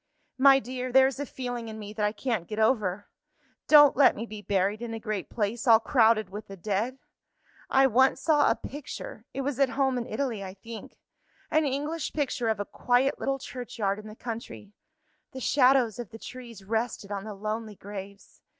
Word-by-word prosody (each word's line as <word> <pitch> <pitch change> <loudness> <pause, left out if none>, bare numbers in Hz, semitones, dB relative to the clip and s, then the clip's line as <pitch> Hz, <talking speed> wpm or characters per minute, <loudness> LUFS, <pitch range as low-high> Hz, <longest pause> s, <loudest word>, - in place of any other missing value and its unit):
My 270 0 +8
dear, 255 0 -4
there 265 +1 +7
is 270 -1 -1
a 285 - -3
feeling 245 -2 -5
in 220 0 -7
me 210 -1 -8
that 215 - -3
I 210 - +2
can't 220 -5 -2
get 210 - -6
over. 215 -4 +1 0.6
Don't 295 -2 +8
let 275 0 +6
me 225 - -4
be 215 -2 -8
buried 200 +2 0
in 230 -1 -4
a - - -5
great 215 -4 -4
place 220 +2 -2
all 225 -1 +8
crowded 225 -5 +3
with 210 +2 -7
the 195 - -10
dead! 215 +7 -2 0.7
I 270 0 +5
once 260 +1 +4
saw 300 -3 +3
a - - +3
picture 270 -5 -8
it 275 - -4
was 275 -1 -3
at 275 -2 +4
home 265 -2 +2
in 235 - -5
Italy, 230 -4 -2
I 190 0 -8
think 225 +3 -10 0.5
an 310 0 +3
English 295 +4 -2
picture 265 -5 -1
of 220 -2 0
a 205 - -2
quiet 250 +5 +1
little 275 0 -1
churchyard 235 -6 -4
in 215 - -10
the 215 - -10
country. 225 -3 -7 0.6
The 260 - -6
shadows 255 -4 +3
of 235 -5 -6
the 225 - -10
trees 235 -4 -10
rested 220 -1 -2
on 200 -1 -3
the 215 -1 -7
lonely 215 +1 -4
graves. 200 0 -10
230 Hz, 195 wpm, -27 LUFS, 210-265 Hz, 0.7 s, My